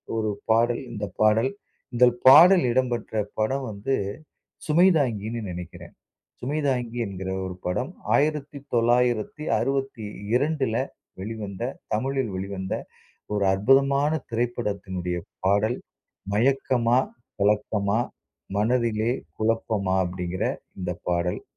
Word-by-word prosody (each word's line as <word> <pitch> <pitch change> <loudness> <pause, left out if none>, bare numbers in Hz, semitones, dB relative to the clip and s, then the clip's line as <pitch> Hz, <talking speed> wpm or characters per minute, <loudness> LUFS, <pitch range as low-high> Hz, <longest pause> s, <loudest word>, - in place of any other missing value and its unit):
ஒரு 110 -1 0 0.2
பாடல், 115 +1 +3
இந்த 105 -3 -3 0.2
பாடல். 110 +5 +4 0.4
இந்த 125 +1 +6 0.2
பாடல் 175 +6 +9
இடம்பெற்ற 120 -3 -1 0.3
படம் 130 +5 0
வந்து 105 +7 -2 0.7
சுமைதாங்கினு 135 - +2
நினைக்கிறேன். 90 0 -8 0.5
சுமைதாங்கி 130 -4 -1
என்கிற 95 -1 -5
ஒரு 90 -1 -5
படம் 125 - -1 0.2
1962ல 130 -2 0 0.5
வெளிவந்த 105 -1 -6 0.3
தமிழில் 130 +1 -1
வெளிவந்த 95 0 -4 0.6
ஒரு 105 -1 +1
அற்புதமான 135 +7 +3 0.2
திரைப்படத்தினுடைய 100 -7 -2 0.3
பாடல். 105 +5 +2 0.6
"மயக்கமா? 125 +1 +3 0.4
கலக்கமா? 105 +1 +1 0.6
மனதிலே 115 0 +1 0.3
குழப்பமா?" 110 -4 0
அப்டிங்கிற 90 0 -3 0.4
இந்த 90 -1 -2 0.2
பாடல். 90 0 -1
115 Hz, 85 wpm, -25 LUFS, 100-135 Hz, 0.7 s, பாடல்